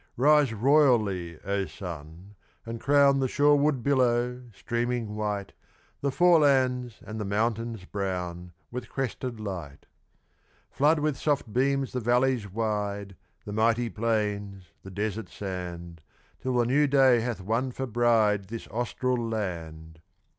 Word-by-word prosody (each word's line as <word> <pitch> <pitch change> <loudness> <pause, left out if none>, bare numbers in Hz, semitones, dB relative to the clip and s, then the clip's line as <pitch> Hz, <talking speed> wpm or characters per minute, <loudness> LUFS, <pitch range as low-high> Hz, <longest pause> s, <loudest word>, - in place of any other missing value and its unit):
Rise 145 0 +4
royally, 110 - +2
O 100 0 -1
sun, 85 +1 -9 0.3
and 115 0 -6
crown 140 0 +4
The 135 - +1
shoreward 145 -1 +3
billow, 125 -2 +1
streaming 120 +1 -2
white, 105 -2 -3 0.5
The 140 - 0
forelands, 135 -6 +3
and 110 0 -6
the - - -2
mountains 110 0 -1
brown, 90 -3 -4 0.2
With 125 +1 -6
crested 125 -3 -4
light; 90 -9 -7 0.9
Flood 150 +3 +3
with 150 -2 -1
soft 140 -8 -1
beams 135 +1 +1
the 125 - -1
valleys 120 -3 +1
wide, 105 -2 -2 0.3
The 105 - -6
mighty 115 +2 +2
plains, 105 -4 -2
the 95 - -10
desert 105 +3 -3
sand, 85 -4 -6 0.4
Till 130 -1 -2
the 120 - +3
New 145 +5 +3
Day 135 -3 +5
hath 115 -1 -3
won 115 +7 -1
for 130 +2 -4
bride 110 -4 +2
This 115 +2 -7
Austral 120 +1 -1
land! 80 -6 -5
115 Hz, 130 wpm, -27 LUFS, 100-130 Hz, 0.9 s, Day